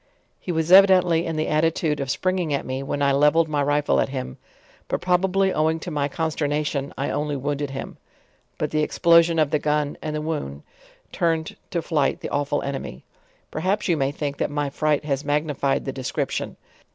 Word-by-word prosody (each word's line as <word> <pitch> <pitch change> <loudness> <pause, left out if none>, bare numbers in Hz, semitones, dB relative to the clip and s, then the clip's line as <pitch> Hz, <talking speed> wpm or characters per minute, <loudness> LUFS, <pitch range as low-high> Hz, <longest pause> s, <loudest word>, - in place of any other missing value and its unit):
He 180 - -4
was 160 0 -1
evidently 185 -3 +6
in 165 - -2
the 155 0 -1
attitude 155 -1 +1
of 135 -1 -3
springing 185 +2 0
at - - -4
me, 130 +1 -3
when 145 +1 -2
I 140 - +3
levelled 150 +4 +4
my 150 -2 0
riflle 145 +1 +2
at - - -1
him; 130 - -5 0.5
but - - -1
probably 190 +1 +2
owing 160 +1 +1
to 175 - -6
my 145 -2 0
consternation, 150 -2 -2
I 140 - -2
only 150 -1 -2
wounded 145 +1 -2
him; 135 0 -7 0.6
but - - -2
the 155 - +1
explosion 170 +1 +4
of 155 -3 +2
the 150 - +2
gun 150 -1 -1
and 155 -1 -4
the 150 - -2
wound 145 - -4 0.5
turned 165 -2 -1
to 170 -2 -2
flight 150 -5 0
the - - -4
awful 145 0 -1
enemy. 135 - -5 0.5
Per - - -4
haps 190 +5 0
you 175 - +3
may 135 -2 0
think, 145 -1 -4
that - - -1
my 145 -1 -2
fright 150 0 0
has 140 -1 -1
magnified 145 -2 0
the 135 - -2
de 130 - -7
scription. - - -3
150 Hz, 195 wpm, -23 LUFS, 140-165 Hz, 0.6 s, evidently